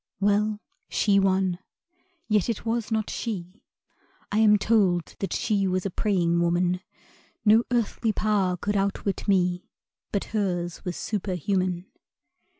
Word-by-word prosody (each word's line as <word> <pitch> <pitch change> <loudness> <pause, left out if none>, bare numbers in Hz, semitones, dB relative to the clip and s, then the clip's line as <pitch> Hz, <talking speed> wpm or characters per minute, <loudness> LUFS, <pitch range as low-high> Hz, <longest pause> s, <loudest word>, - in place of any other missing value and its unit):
Well, 205 +1 +2 0.3
she 200 -2 +3
won 190 -2 +1 0.7
(yet 210 0 +2
it 230 - -3
was 230 0 -1
not 220 -1 0
she 195 -3 -5 0.7
I 210 - +2
am 210 -1 +6
told 195 -5 +2
that 195 - -3
she 200 -3 +1
was 185 0 -1
a 195 - -1
praying 175 -4 +1
woman: 175 +1 +1 0.6
No 220 +3 +6
earthly 235 -1 0
power 200 -4 +1
could 205 +4 -2
outwit 200 0 -1
me 180 -2 +1 0.4
But 200 - 0
hers 175 -5 -1
was 180 -3 -4
superhuman). 185 -2 -1
195 Hz, 130 wpm, -26 LUFS, 180-210 Hz, 0.7 s, am